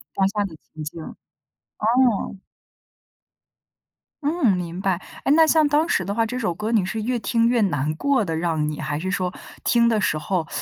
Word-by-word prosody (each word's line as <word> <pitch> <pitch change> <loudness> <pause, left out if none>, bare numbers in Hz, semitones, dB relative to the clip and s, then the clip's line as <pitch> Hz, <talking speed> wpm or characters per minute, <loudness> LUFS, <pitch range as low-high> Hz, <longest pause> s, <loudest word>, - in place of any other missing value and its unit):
当 195 - +3
下 205 0 -1
的 175 -5 -8 0.2
情 155 - -7
境， 155 +2 -7 0.8
哦。 225 -3 +2 1.9
嗯， 290 - +2
明 175 0 -5
白。 190 -1 +1 0.3
哎， 275 - +3
那 325 0 +7
像 315 -1 +4
当 300 +3 +2
时 185 - +1
的 200 +2 -3
话， 230 - +2
这 250 +3 -4
首 180 -8 -1
歌 215 +5 -3
你 215 -5 +3
是 215 +4 -3
越 240 +2 -1
听 230 0 +1
越 240 0 +3
难 155 -7 +1
过 275 - +1
的 165 -5 -3
让 160 -3 0
你， 150 - -5
还 150 -1 -2
是 185 +5 -3
说 185 -1 -1 0.3
听 235 -1 +4
的 225 -2 +2
时 170 -6 +1
候 165 +1 -2
200 Hz, 205 characters per minute, -23 LUFS, 170-235 Hz, 1.9 s, 那